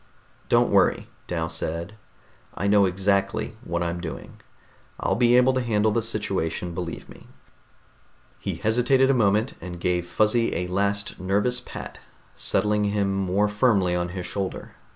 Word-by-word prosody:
"Don't - - +3
worry," - - +3 0.2
Dal 80 -2 -2
said. 85 +3 -4 0.6
"I 100 - -3
know 100 0 +5
exactly 100 +3 0
what 85 +1 -2
I'm 85 0 -3
doing. 80 -3 -8 0.6
I'll - - 0
be 120 0 +4
able 130 +1 +5
to 130 - 0
handle 110 -2 +1
the 115 - +1
situation, 95 -6 -2
believe 85 -1 -5
me." - - -15 1.1
He - - -3
hesitated 125 +4 +3
a - - +3
moment, 110 0 +2
and 90 0 -7
gave 90 0 0
Fuzzy 110 +4 +1
a 90 - -1
last 100 +2 -1
nervous 105 +6 +1
pat, 125 - -9 0.4
settling 105 0 +1
him 100 -1 0
more 95 +2 +1
firmly 105 -4 +2
on 90 0 -1
his 90 0 -5
shoulder. 95 -2 -4
100 Hz, 150 wpm, -24 LUFS, 90-110 Hz, 1.1 s, know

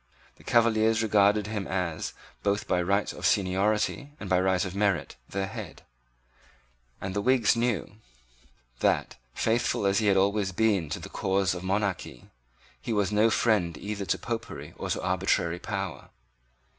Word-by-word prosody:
The - - -18
Cavaliers 115 -1 +3
regarded 105 -1 +3
him 105 -2 -3
as, 90 -4 -2 0.3
both 100 0 0
by 90 - +2
right 100 +3 0
of - - -10
seniority 105 +9 +1
and 100 - -6
by 90 - +4
right 95 0 +2
of 95 0 -6
merit, 100 -9 0
their 100 0 -2
head; 100 - -8 1.2
and 95 -1 -4
the 100 - -1
Whigs 125 -1 +3
knew 115 -3 -1 0.8
that, - - +1 0.2
faithful 115 -2 +1
as 100 +1 +3
he 110 - +1
had 100 -1 +4
always 100 0 +1
been 100 -6 +1
to - - -3
the - - -8
cause 95 -1 0
of 90 - -5
monarchy, 95 - -2 0.5
he 115 - -3
was 105 -2 +1
no 105 +2 +4
friend 100 -9 +1
either 100 -1 -4
to - - 0
Popery 115 -1 -5
or - - -5
to - - -2
arbitrary 90 -2 +1
power. 95 -3 -5
100 Hz, 155 wpm, -28 LUFS, 95-110 Hz, 1.2 s, by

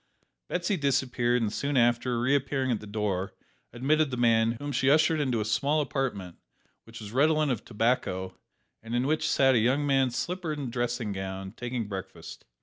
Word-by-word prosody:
Betsy 180 +2 -1
disappeared, 125 -4 +1
and 105 -1 -1
soon 140 -1 -1
after, 120 0 +2
reappearing 135 +1 +1
at 115 - 0
the 105 - -11
door, 100 -3 -2 0.4
admitted 150 +5 +1
the 125 - -4
man, 115 -1 +3
whom 145 +5 -6
she 135 0 +1
ushered 155 +2 +4
into 130 -6 0
a 105 - -1
small 140 +8 +1
apartment, 125 - -3 0.5
which 115 +1 -11
was 105 -1 -8
redolent 150 +3 +3
of 120 - -3
tobacco, 105 -5 -1 0.5
and 115 +2 -5
in 125 +1 +1
which 155 +2 0
sat 135 -1 +4
a 120 - +4
young 130 +6 +2
man 135 -2 +3
slippered 155 +6 -3
and 135 -4 -4
dressing 120 -2 -2
gowned, 95 +1 -6
taking 120 -3 -4
breakfast. 95 -2 -8
125 Hz, 175 wpm, -28 LUFS, 110-140 Hz, 0.5 s, ushered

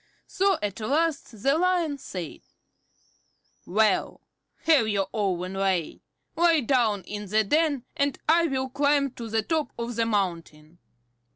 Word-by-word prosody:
So 390 -2 +1
at 205 0 -3
last 280 -3 -1
the 275 +4 +3
Lion 345 -5 +1
said: 180 - -7 1.3
"Well, 210 +1 +1 0.4
have 305 -9 +4
your 200 -2 0
own 185 -3 -1
way. 190 -4 -1 0.3
Lie 335 -2 +4
down 230 -6 +1
in 205 +2 -6
the 215 +3 +2
den, 295 +2 +1
and 280 0 0
I 335 +2 +4
will 265 -2 -1
climb 285 0 +1
to 235 -2 -8
the 220 0 0
top 310 0 -1
of 235 0 -4
the 230 -1 +1
mountain." 170 -6 -3
235 Hz, 135 wpm, -26 LUFS, 200-295 Hz, 1.3 s, have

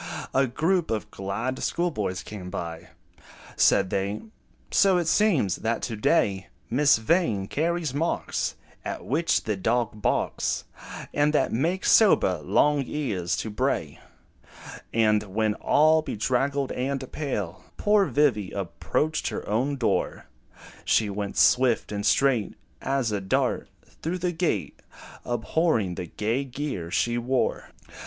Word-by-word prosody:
A 135 0 +3
group 165 +7 0
of 110 -2 -3
glad 105 +7 -3
schoolboys 110 - -1
came 95 -4 -8
by: 85 -1 -6 0.7
Said 95 -2 +3
they, 100 +2 -2 0.5
"So 195 -2 +4
it 175 - 0
seems, 165 - +2
that 115 +1 -2
to 115 - -3
day, 100 -2 +1 0.2
Miss 140 +2 +4
Vain 110 - +1
carries 165 - -1
marks 160 +4 -1 0.3
At - - -5
which 160 +6 +1
the 105 - -1
dog 110 +1 -1
barks, - - 0 0.5
And 150 +1 +2
that - - +2
make 165 +11 0
sober 95 - +5
Long 145 - +2
Ears 100 - -2
to 110 - -4
bray." 105 - -1 0.9
And 110 -2 +3
when, 105 +2 -1
all 155 +7 +3
bedraggled 135 +2 -1
and 130 +1 -3
pale, 105 - -4
Poor 205 -2 +3
Vivy 130 -10 +2
approached 125 - -2
her - - -4
own 125 +7 0
door, 125 -4 -1 0.6
She 105 -2 +2
went, 100 0 -4
swift 125 -4 +3
and 105 -1 -3
straight 120 0 +2 0.3
As 135 -4 0
a 105 -1 -1
dart, 95 - 0 0.3
through 170 +3 -2
the 180 0 -1
gate, 170 0 -2 0.4
Abhorring 120 - 0
the 90 0 -5
gay 115 - -1
gear 130 - -5
she 120 +6 0
wore. 125 +2 -1
120 Hz, 130 wpm, -26 LUFS, 105-150 Hz, 0.9 s, sober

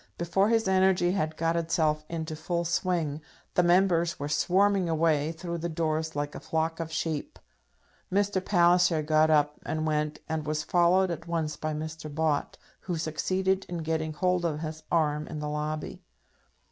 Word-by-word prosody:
before 195 +4 +1
his 225 -2 +2
energy 190 -2 +3
had 155 -5 -1
got 165 0 +1
itself 160 -2 +1
into 160 -1 -4
full 170 +2 -2
swing, 165 -3 -1 0.3
the - - +4
Members 175 -1 +3
were 145 - -3
swarming 190 +5 +2
away 160 -2 +2
through 170 +1 -5
the 170 +1 -3
doors 160 -1 -1
like 145 0 -2
a - - -6
flock 160 +1 -2
of 165 -1 -4
sheep. 160 -2 -3 0.7
Mr. 195 -1 +1
Palliser 175 -3 +4
got 155 +1 +3
up 150 -1 +2
and 155 0 -2
went, 150 -1 0
and 160 -1 -3
was 155 0 -1
followed 175 +3 +3
at 170 0 -6
once 160 -3 -1
by 155 - -3
Mr. 155 0 -6
Bott, 150 -1 -1 0.2
who 175 -3 -4
succeeded 190 +5 0
in 170 -2 -4
getting 160 0 -1
hold 180 +2 +1
of 155 -3 -1
his 155 0 -5
arm 150 -2 +1
in 155 - -6
the 150 0 -4
lobby. 150 +1 -4
160 Hz, 170 wpm, -28 LUFS, 155-175 Hz, 0.7 s, the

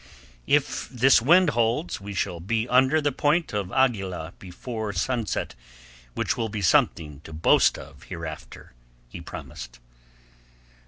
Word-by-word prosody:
"If - - +1
this 130 0 +4
wind 170 +5 +5
holds 120 - -1
we 100 0 -7
shall 90 -2 -2
be 110 +6 -1
under 130 +5 +3
the 145 -1 +1
Point 150 +4 0
of 100 -2 -3
Aguila 95 -10 0
before 105 +3 -6
sunset, 120 - -2 0.6
which - - -1
will 115 - -2
be 105 -1 -4
something 75 -4 +2
to - - -11
boast 80 +1 +3
of - - -12
hereafter," 80 -5 -8 0.4
he - - -9
promised. - - -9
110 Hz, 130 wpm, -25 LUFS, 90-130 Hz, 0.6 s, wind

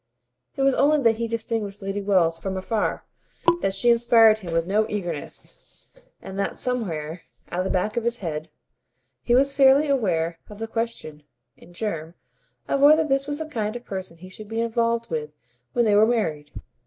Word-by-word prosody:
It 275 - -1
was 275 0 +4
not - - +1
only 300 +2 +4
that 225 -1 +4
he 230 0 -2
distinguished 225 -3 -3
Lady 195 0 -3
Wells 180 -5 +2
from 190 +1 -4
afar, 210 +3 -2 0.6
that 195 0 0
she 240 +4 +3
inspired 230 -2 +5
him 180 -5 -7
with 165 0 +1
no 210 +4 +1
eagerness, 175 -8 -4 0.7
and 195 +1 -7
that, 200 - -2
somewhere 170 -10 -2 0.3
at 175 - -2
the 190 - -2
back 205 +5 -1
of 235 - 0
his 235 +1 0
head, 160 -5 -5 0.7
he 240 - +2
was 275 +2 +3
fairly 275 +2 +5
aware 170 - 0
of 210 - -10
the 225 +1 -4
question, 225 -10 -4 0.3
in - - -17
germ, 170 -4 -4 0.5
of 275 - 0
whether 305 +3 +6
this 275 -2 0
was 290 0 -2
the 320 - -3
kind 220 -6 -3
of 245 - -8
person 185 -3 -6
he 185 +2 -12
should 210 +3 -10
be 225 +1 -3
involved 230 0 0
with 150 -1 -4 0.4
when 240 - +2
they 210 - +3
were 210 +2 +5
married. 155 -11 -1
215 Hz, 190 wpm, -24 LUFS, 180-235 Hz, 0.7 s, whether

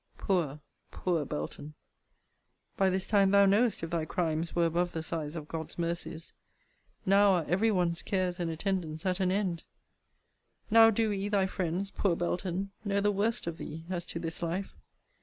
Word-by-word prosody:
Poor, 165 -7 0 0.3
poor 170 -5 -1
Belton! 135 - -5 1.0
by 195 -1 +3
this 190 0 -1
time 200 -2 +4
thou 200 0 +6
knowest 210 +1 +3
if 165 - -4
thy 170 -2 0
crimes 160 0 -1
were 170 -1 +3
above 175 +2 0
the 160 - -3
size 160 -1 -4
of 155 -2 -6
God's 160 -1 -6
mercies! 170 -1 -4 0.7
Now 200 +1 +5
are 175 -4 +1
every 195 +7 +2
one's 175 -4 +1
cares 185 -2 -1
and 170 -1 -1
attendance 165 -1 -2
at 185 0 0
an 185 -1 +2
end! 185 -4 0 1.1
now 225 0 +8
do 225 0 +1
we, 200 0 -2
thy 200 -2 +2
friends, 190 +1 -2
poor 190 -4 +1
Belton! 180 +2 -2
know 200 -1 +1
the 205 +1 +2
worst 210 +3 0
of 170 0 -4
thee, 160 +2 -7
as 175 -2 -2
to - - -5
this 165 -1 -5
life! 175 +3 -2
180 Hz, 175 wpm, -30 LUFS, 165-195 Hz, 1.1 s, now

